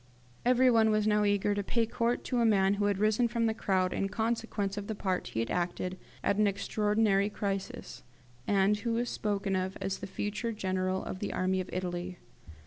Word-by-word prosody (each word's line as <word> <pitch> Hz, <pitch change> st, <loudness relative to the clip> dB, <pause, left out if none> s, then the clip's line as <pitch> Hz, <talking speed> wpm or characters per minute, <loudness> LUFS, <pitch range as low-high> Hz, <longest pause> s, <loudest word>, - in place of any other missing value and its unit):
Everyone 245 Hz, -3 st, +5 dB
was 215 Hz, -1 st, +2 dB
now 210 Hz, -1 st, +3 dB
eager 205 Hz, 0 st, +2 dB
to 205 Hz, -, -1 dB
pay 230 Hz, +3 st, 0 dB
court 235 Hz, +2 st, -1 dB
to 250 Hz, -, -1 dB
a -, -, +3 dB
man 195 Hz, -3 st, +4 dB
who 205 Hz, 0 st, 0 dB
had 205 Hz, -1 st, +1 dB
risen 215 Hz, +4 st, +3 dB
from 230 Hz, 0 st, 0 dB
the 220 Hz, -, +2 dB
crowd 185 Hz, -4 st, 0 dB
in 195 Hz, -, -1 dB
consequence 220 Hz, -2 st, -1 dB
of 205 Hz, -1 st, -5 dB
the 220 Hz, -, -3 dB
part 190 Hz, -2 st, -2 dB
he 115 Hz, -, -2 dB
had 115 Hz, -, -3 dB
acted 180 Hz, +1 st, -2 dB, 0.3 s
at 200 Hz, -, +1 dB
an 210 Hz, 0 st, +4 dB
extraordinary 205 Hz, 0 st, +1 dB
crisis, 195 Hz, -2 st, -4 dB, 0.5 s
and 200 Hz, +1 st, +3 dB
who 230 Hz, +2 st, -2 dB
was 240 Hz, +1 st, -1 dB
spoken 200 Hz, -2 st, -1 dB
of 185 Hz, +1 st, -2 dB
as 195 Hz, 0 st, -3 dB
the -, -, -6 dB
future 210 Hz, +4 st, -3 dB
General 185 Hz, -2 st, -1 dB
of 185 Hz, -, -5 dB
the 205 Hz, -, -3 dB
Army 185 Hz, 0 st, 0 dB
of 185 Hz, -, -8 dB
Italy. 180 Hz, 0 st, -4 dB
205 Hz, 200 wpm, -30 LUFS, 190-220 Hz, 0.5 s, Everyone